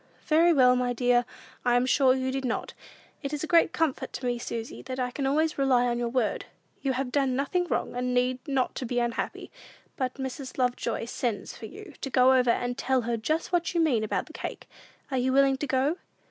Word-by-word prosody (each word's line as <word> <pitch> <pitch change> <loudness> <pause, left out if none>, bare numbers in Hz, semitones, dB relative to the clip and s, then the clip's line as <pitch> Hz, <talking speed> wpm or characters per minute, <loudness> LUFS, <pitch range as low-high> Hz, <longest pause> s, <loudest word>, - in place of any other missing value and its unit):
"Very 330 +2 +5
well, 255 -5 +5
my 250 0 0
dear; 245 0 +2 0.4
I 245 -1 +3
am 245 +1 +3
sure 260 0 +4
you 260 0 -1
did 270 0 -3
not. 250 -2 -2 0.5
It 280 +1 -4
is 295 - -3
a - - -2
great 335 -1 +4
comfort 320 -5 -1
to 255 - -5
me, 245 -1 0
Susy, 230 -1 -5
that 260 -1 -6
I 250 -1 -1
can 270 +1 -2
always 310 +2 +1
rely 255 -3 +3
on 240 -1 0
your 240 -1 -1
word. 235 -3 -1 0.4
You 270 -1 0
have 255 0 -2
done 270 -2 +1
nothing 350 +7 0
wrong, - - -1
and 250 0 -1
need 250 +1 +1
not 270 -2 -1
be 245 - -2
unhappy; 240 -1 -2 0.5
but 255 -2 -2
Mrs. 265 0 -6
Lovejoy 245 -3 -1
sends 235 -2 -3
for 220 - -8
you 400 - -11
to 270 - -3
go 255 0 +5
over 250 -2 +3
and 245 +1 0
tell 260 -1 +1
her 235 0 -1
just 310 +11 -1
what 345 -1 0
you - - +3
mean 270 -10 +2
about 215 - -1
the - - -14
cake; - - -6 0.4
are 260 - +1
you 255 +1 +1
willing 270 0 +4
to 290 - -3
go?" 270 +6 +1
260 Hz, 220 wpm, -27 LUFS, 245-275 Hz, 0.5 s, Very